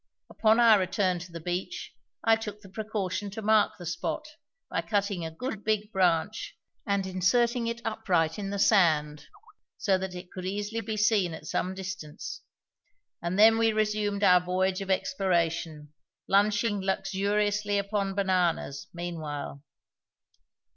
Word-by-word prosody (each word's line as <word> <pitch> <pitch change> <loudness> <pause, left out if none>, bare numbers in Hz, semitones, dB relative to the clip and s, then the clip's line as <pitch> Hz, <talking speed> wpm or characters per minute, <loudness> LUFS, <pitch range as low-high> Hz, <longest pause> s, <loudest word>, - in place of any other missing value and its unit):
Upon 220 +1 +3
our 225 -3 +7
return 185 -1 0
to 175 +1 -10
the 170 - -7
beach 175 +2 -4 0.3
I 225 0 +5
took 210 -2 -7
the 195 - -14
precaution 205 -1 -3
to 210 +3 -6
mark 215 0 +4
the 175 - -9
spot 175 - -3 0.4
by - - -1
cutting 200 -4 -1
a 160 - -3
good 220 +5 -5
big 215 0 0
branch 185 +1 0 0.3
and 200 -1 +1
inserting 230 +6 +1
it 235 +1 -4
upright 185 -7 0
in 195 -1 -3
the 200 - -3
sand, 155 -8 +3 0.5
so 190 -3 +2
that 190 -1 -5
it 180 0 -9
could 185 - -7
easily 205 +3 -3
be 220 0 -4
seen 205 -5 +2
at 155 - -11
some 185 +4 -2
distance; 185 -5 -7 0.8
and 175 +2 -2
then 225 +2 +7
we 225 0 +4
resumed 210 -1 0
our 180 -2 +6
voyage 185 +2 0
of 195 - -6
exploration, 170 - -1 0.3
lunching 205 +1 +2
luxuriously 205 +2 0
upon 200 -1 -1
bananas, 180 -7 0
meanwhile. 155 -5 -5
195 Hz, 145 wpm, -28 LUFS, 180-210 Hz, 0.8 s, our